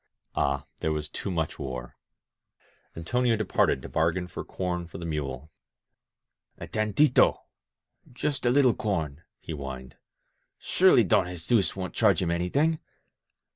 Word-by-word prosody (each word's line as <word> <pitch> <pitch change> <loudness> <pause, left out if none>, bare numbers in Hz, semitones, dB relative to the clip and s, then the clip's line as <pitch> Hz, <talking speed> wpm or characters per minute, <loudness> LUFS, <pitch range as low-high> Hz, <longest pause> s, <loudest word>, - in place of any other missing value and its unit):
Ah, 70 -1 0
there 80 - 0
was 75 -1 -2
too 100 - -5
much 80 -4 -2
war! 65 -3 -6 1.0
Antonio 120 +8 +1
departed 105 -10 +1
to - - -6
bargain 85 +3 0
for - - -6
com 90 -2 -3
for - - -9
the 85 - -6
mule. 75 -2 -4 1.1
A - - -7
tanita— 110 +6 +3 0.8
just 135 +2 -2
a 120 - +3
little 130 -1 +5
corn," 80 -10 -2 0.2
he - - -8
whined. 65 -3 -7 0.6
"Surely - - +4
Don - - +3
Jesus 90 +2 +1
wouldn't 95 -1 -5
charge 105 -6 +3
him 85 -2 0
anything. 140 - +1
90 Hz, 135 wpm, -27 LUFS, 75-110 Hz, 1.1 s, little